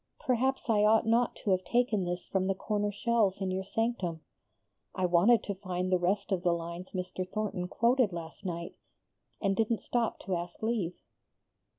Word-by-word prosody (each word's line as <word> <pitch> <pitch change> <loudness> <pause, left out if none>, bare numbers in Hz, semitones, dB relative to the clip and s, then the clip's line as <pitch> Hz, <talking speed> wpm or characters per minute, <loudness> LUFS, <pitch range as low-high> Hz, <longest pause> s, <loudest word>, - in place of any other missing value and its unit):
Perhaps 265 +2 0
I 210 -3 +3
ought 220 +1 +5
not 230 +2 +2
to 205 - +1
have 185 0 +2
taken 230 -3 +1
this 175 0 -3
from 190 -1 0
the 195 - +1
corner 205 +1 -1
shelves 205 -2 +1
in 190 -1 -1
your 190 +1 -1
sanctum? 195 -6 -2 0.7
I 185 - +1
wanted 180 +7 +5
to 200 - -3
find 185 -1 -3
the 185 - +4
rest 195 +3 0
of 185 -2 +1
the 175 -2 +2
lines 170 +2 -5
Mr. 185 0 -4
Thornton 205 -4 -2
quoted 235 +2 +2
last 165 -2 -7
night, 170 -2 -4 0.7
and 195 -1 +1
didn't 225 +2 +1
stop 235 0 -1
to 190 - -2
ask 175 +4 -6
leave." 220 -7 -1
195 Hz, 180 wpm, -30 LUFS, 180-225 Hz, 0.7 s, ought